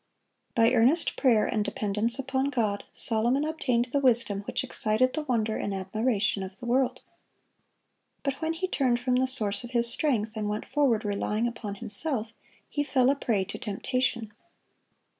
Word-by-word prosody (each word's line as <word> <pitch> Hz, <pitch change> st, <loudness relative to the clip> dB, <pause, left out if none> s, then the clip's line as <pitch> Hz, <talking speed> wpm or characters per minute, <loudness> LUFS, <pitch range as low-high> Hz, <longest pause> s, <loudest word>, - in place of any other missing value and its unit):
By 230 Hz, 0 st, +5 dB
earnest 260 Hz, +8 st, +3 dB
prayer 235 Hz, -6 st, +3 dB
and 215 Hz, -3 st, 0 dB
dependence 210 Hz, +2 st, -1 dB
upon 265 Hz, 0 st, -1 dB
God, 220 Hz, -7 st, -1 dB
Solomon 240 Hz, +6 st, +2 dB
obtained 255 Hz, -6 st, 0 dB
the 285 Hz, -, +3 dB
wisdom 235 Hz, -6 st, +3 dB
which -, -, -1 dB
excited 220 Hz, +4 st, +1 dB
the 310 Hz, -, -1 dB
wonder 230 Hz, -6 st, 0 dB
and 200 Hz, -, -3 dB
admiration 205 Hz, +2 st, 0 dB
of 190 Hz, +1 st, -7 dB
the 245 Hz, -, -8 dB
world. 250 Hz, +2 st, +1 dB, 1.2 s
But 275 Hz, +1 st, -2 dB
when 320 Hz, 0 st, 0 dB
he 365 Hz, +3 st, -2 dB
turned 255 Hz, -8 st, +1 dB
from 250 Hz, 0 st, +1 dB
the 260 Hz, +1 st, +2 dB
Source 215 Hz, -5 st, 0 dB
of 240 Hz, -, -7 dB
his 235 Hz, 0 st, +1 dB
strength, 225 Hz, -7 st, 0 dB
and 210 Hz, -1 st, -2 dB
went 210 Hz, +1 st, -3 dB
forward 245 Hz, -7 st, +1 dB
relying 210 Hz, +2 st, 0 dB
upon 225 Hz, -4 st, -5 dB
himself, 225 Hz, +2 st, -3 dB, 0.3 s
he 290 Hz, -, -1 dB
fell 260 Hz, -2 st, +3 dB
a -, -, +1 dB
prey 220 Hz, -8 st, 0 dB
to -, -, -7 dB
temptation. 235 Hz, +1 st, -2 dB
235 Hz, 165 wpm, -28 LUFS, 215-265 Hz, 1.2 s, By